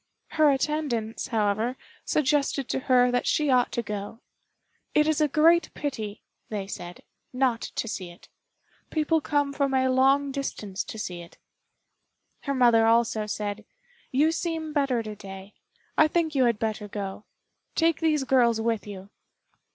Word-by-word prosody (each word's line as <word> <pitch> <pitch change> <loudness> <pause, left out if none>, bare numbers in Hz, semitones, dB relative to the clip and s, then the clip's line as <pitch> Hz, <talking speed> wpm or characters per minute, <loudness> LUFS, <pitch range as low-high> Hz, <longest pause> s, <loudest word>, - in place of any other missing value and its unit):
Her 310 -1 +4
attendants, 270 -6 -1
however, 220 +2 0 0.3
suggested 280 -2 +1
to - - 0
her 250 -1 +5
that 245 - 0
she 300 -3 +2
ought 250 -1 +3
to 235 - -1
go. 210 +1 -6 0.8
"It 300 0 +4
is 315 0 +1
a 305 - +4
great 320 +3 +4
pity," 220 -8 -4 0.3
they 205 -3 -3
said, 175 -2 -8 0.3
"not 250 -3 +1
to - - -4
see 185 -4 -5
it; 175 - -16 0.6
people 315 0 +1
come 290 -1 0
from 275 -1 0
a 260 0 +2
long 270 +2 +3
distance 215 -8 -4
to - - -8
see 180 -5 -5
it." 170 - -14 1.1
Her 280 -1 -1
mother 235 -3 +5
also 225 -2 +2
said, 210 0 -4 0.5
"You 295 +5 +3
seem 325 -2 -3
better 275 -5 +1
to 215 -1 -7
day. 195 0 -10 0.5
I 310 - +7
think 320 0 0
you 265 -3 +3
had 235 -3 +2
better 215 -1 -3
go. 200 0 -6 0.5
Take 330 -1 +2
these 310 -3 +2
girls 245 -4 +3
with 225 -2 -1
you." 195 0 -9
250 Hz, 155 wpm, -26 LUFS, 215-290 Hz, 1.1 s, I